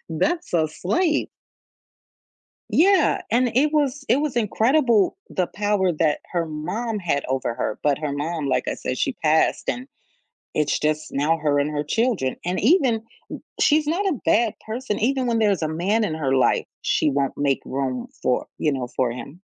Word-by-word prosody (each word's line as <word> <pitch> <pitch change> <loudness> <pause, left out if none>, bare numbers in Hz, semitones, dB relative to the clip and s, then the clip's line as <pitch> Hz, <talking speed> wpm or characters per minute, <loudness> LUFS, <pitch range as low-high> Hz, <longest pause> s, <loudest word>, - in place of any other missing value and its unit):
that's 330 - -1
a 160 -2 +3
slave. 300 - 0 1.4
Yeah. 370 0 +4
And 245 +1 +2
it 295 +4 +3
was 280 -2 0
it 245 - +5
was 295 -5 -2
incredible, 235 - +2
the 180 -2 -1
power 205 -2 0
that 155 -1 +1
her 170 -2 0
mom 200 +9 -3
had 160 -6 -1
over 130 -2 -1
her, 110 -3 -3
but 145 -2 +2
her 150 -2 -2
mom, 150 +1 -3
like 130 - 0
I - - -1
said, 130 - -4
she - - 0
passed 160 0 +1
and 255 +2 -3 0.7
it's 150 -1 +1
just 155 0 -1
now 150 +4 +1
her 150 -2 +1
and 145 +1 0
her 145 -1 -2
children. 195 - 0
And 180 +1 -1
even 265 - +4
m 220 - -5 0.6
she's 300 0 +4
not 350 +7 0
a 345 -9 0
bad 225 -1 +3
person. 220 0 -3
Even 260 +2 +1
when 235 -1 +1
there's 205 -5 +2
a 155 - 0
man 190 +8 0
in 165 - -2
her 140 -4 0
life, 130 - +2 0.2
she - - +2
won't 140 -1 -1
make 140 -2 +1
room 130 -2 -3
for, 125 - +1
you 150 - +1
know, 130 -3 -3
for 125 -2 +1
him. 130 +8 -9
180 Hz, 180 wpm, -23 LUFS, 150-245 Hz, 1.4 s, it